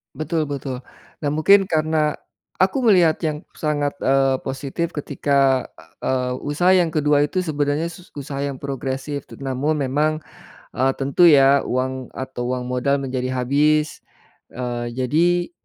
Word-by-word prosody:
Betul 155 0 -2
betul 135 -3 -4 0.4
dan 145 -1 -1
mungkin 195 +5 +5
karena 155 -2 +1 0.5
aku 190 +8 +2
melihat 175 -7 +5
yang 150 -1 -1 0.2
sangat, 145 -2 -1
eee, 135 0 +3
positif 135 +5 -3
ketika 140 -2 +1 0.4
eee, 125 -1 -1
usaha 155 +5 +1
yang 175 -3 +3
ke-2 150 -1 +3
itu 185 +5 -1
sebenarnya 150 0 -1
sus 180 +2 -14
usaha 140 -1 -6
yang 140 -1 -2
progresif 135 +1 -4 0.2
namun 135 +3 -1
memang, 145 +4 +1 0.7
eee, 135 +1 +2
tentu 140 +6 +2
ya 140 -1 +5
uang 130 0 -2
atau 130 -2 -4
uang 125 -1 -3
modal 135 +3 +1
menjadi 130 -1 -3
habis, 150 +4 +1 0.5
eee, 120 -1 -4
jadi 170 +8 +1
145 Hz, 135 wpm, -21 LUFS, 130-155 Hz, 0.7 s, mungkin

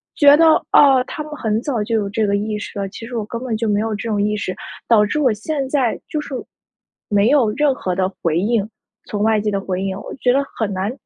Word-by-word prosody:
觉 285 -1 +7
得， 330 - +5 0.2
哦， 270 -3 +6
他 305 - -6
们 305 - -11
很 220 -6 -1
早 245 -5 -2
就 225 +2 -1
有 205 -2 0
这 215 +1 0
个 200 0 +1
意 210 +1 -2
识 205 - -7
了， 195 -1 -3
其 225 - -9
实 240 +1 -7
我 215 - -1
根 235 +3 -6
本 240 -3 -2
就 220 +1 -2
没 205 0 +2
有 225 -1 -2
这 225 +2 -5
种 210 - 0
意 210 +1 0
识， 185 -3 -3 0.3
导 215 -3 +5
致 300 +9 -2
我 260 -6 +3
现 270 +5 -3
在 265 -5 0
就 305 - -2
是 290 - -9 0.8
没 205 +2 +3
有 255 -7 +3
任 290 +3 +2
何 185 -7 -3
的 185 0 0
回 165 0 +1
应 210 +1 0 0.4
从 205 0 -3
外 220 -1 +3
界 210 0 -1
的 195 - -1
回 190 -1 -3
应， 190 -1 -3
我 - - -8
觉 250 -1 +1
得 280 +1 +2 0.2
很 210 -2 0
难， 190 +4 -2
220 Hz, 275 characters per minute, -19 LUFS, 205-255 Hz, 0.8 s, 觉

